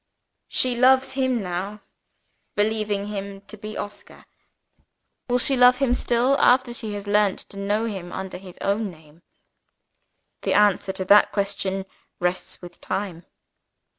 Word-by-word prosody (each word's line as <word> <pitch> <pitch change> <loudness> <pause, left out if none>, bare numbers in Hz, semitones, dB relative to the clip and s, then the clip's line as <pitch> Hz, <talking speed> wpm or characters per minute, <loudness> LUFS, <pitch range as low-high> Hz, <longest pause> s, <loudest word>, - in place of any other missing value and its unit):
She 250 -1 +1
loves 260 +2 +4
him 260 -4 0
now, 190 +4 -4 0.7
believing 210 -1 0
him 200 -1 -6
to 205 +2 -11
be 215 +1 -8
Oscar. 205 0 -8 1.0
Will 245 - +3
she 270 +2 +4
love 250 0 +6
him 260 -2 +2
still, 245 +2 +2
after 250 -1 +4
she 220 -3 -5
has 205 0 -6
learnt 205 -1 +2
to 200 - -10
know 205 +3 0
him 190 -6 -5
under 190 -1 -6
his 185 -2 -12
own 205 +1 0
name? 160 -1 -17 1.2
The - - 0
answer 205 -2 +3
to 190 0 -4
that 205 +2 +6
question 195 -1 -2 0.3
rests 180 0 -3
with 175 -1 -12
Time. 180 -4 -4
205 Hz, 140 wpm, -24 LUFS, 190-235 Hz, 1.2 s, love